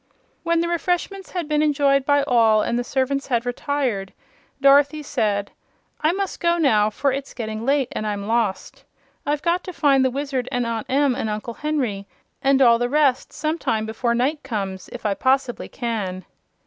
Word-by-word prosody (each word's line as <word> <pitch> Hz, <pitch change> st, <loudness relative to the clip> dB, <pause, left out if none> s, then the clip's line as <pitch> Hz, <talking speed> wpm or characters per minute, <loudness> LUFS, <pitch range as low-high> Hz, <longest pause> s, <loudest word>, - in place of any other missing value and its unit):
When 335 Hz, 0 st, +1 dB
the 340 Hz, -, -1 dB
refreshments 355 Hz, +3 st, -2 dB
had 350 Hz, -4 st, -3 dB
been 300 Hz, 0 st, +1 dB
enjoyed 280 Hz, -2 st, +2 dB
by 285 Hz, -1 st, +4 dB
all 225 Hz, -5 st, +4 dB
and 235 Hz, -, -1 dB
the -, -, -1 dB
servants 270 Hz, +2 st, -1 dB
had 240 Hz, -2 st, 0 dB
retired 245 Hz, -6 st, -2 dB, 0.5 s
Dorothy 280 Hz, +2 st, +4 dB
said: 205 Hz, -6 st, -1 dB, 0.5 s
"I 310 Hz, -, +3 dB
must 390 Hz, +1 st, -3 dB
go 340 Hz, 0 st, +2 dB
now, 215 Hz, -10 st, +3 dB
for 275 Hz, +6 st, 0 dB
it's 275 Hz, +1 st, -5 dB
getting 220 Hz, 0 st, -5 dB
late 275 Hz, -2 st, +2 dB
and 215 Hz, -, -3 dB
I'm 205 Hz, -1 st, -3 dB
lost. 225 Hz, -3 st, -1 dB, 0.4 s
I've 295 Hz, 0 st, 0 dB
got 345 Hz, +1 st, +1 dB
to 370 Hz, -, -5 dB
find 275 Hz, -4 st, +3 dB
the 260 Hz, -, +3 dB
Wizard 270 Hz, -1 st, -3 dB
and 245 Hz, -1 st, 0 dB
Aunt 230 Hz, -2 st, -3 dB
Em 275 Hz, 0 st, +3 dB
and 220 Hz, -, -3 dB
Uncle 215 Hz, +2 st, -4 dB
Henry 245 Hz, -10 st, -2 dB, 0.3 s
and 270 Hz, 0 st, +4 dB
all 235 Hz, -2 st, +5 dB
the 245 Hz, 0 st, 0 dB
rest 280 Hz, -2 st, +2 dB
sometime 295 Hz, -8 st, -1 dB
before 235 Hz, +2 st, -1 dB
night 280 Hz, +5 st, 0 dB
comes, 195 Hz, -6 st, -4 dB
if 240 Hz, -, -9 dB
I 205 Hz, -, +2 dB
poss'bly 260 Hz, +2 st, 0 dB
can." 205 Hz, -7 st, -4 dB
260 Hz, 180 wpm, -22 LUFS, 225-290 Hz, 0.5 s, all